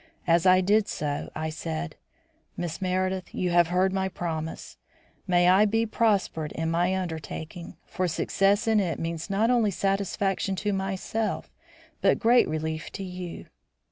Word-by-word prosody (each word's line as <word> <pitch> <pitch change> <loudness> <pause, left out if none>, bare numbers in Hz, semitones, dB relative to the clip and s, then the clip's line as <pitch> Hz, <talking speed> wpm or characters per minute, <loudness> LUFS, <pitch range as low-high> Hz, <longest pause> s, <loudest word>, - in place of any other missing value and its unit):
As 170 +1 +3
I 185 0 +6
did 205 +3 +3
so, 145 -1 -3
I 155 0 -3
said: 80 - -4 0.6
"Miss 175 +1 -4
Meredith, 185 0 -1
you 180 -1 0
have 175 -1 +5
heard 185 +2 +2
my 190 0 0
promise. 160 -3 -5 0.5
May 175 -1 +4
I 190 +3 +6
be 225 +2 +1
prospered 200 -9 0
in 165 0 -2
my 175 +3 +1
undertaking, 165 -1 -6
for 185 - -2
success 195 +6 +1
in 220 -1 +4
it 180 -5 -1
means 165 +2 -4
not 215 +4 +2
only 235 -4 +3
satisfaction 195 0 0
to 205 +2 -1
myself 195 +3 -2 0.5
but - - +4
great 240 +1 +4
relief 155 0 -3
to 195 - -5
you. 180 -2 -7
185 Hz, 150 wpm, -27 LUFS, 165-195 Hz, 0.6 s, I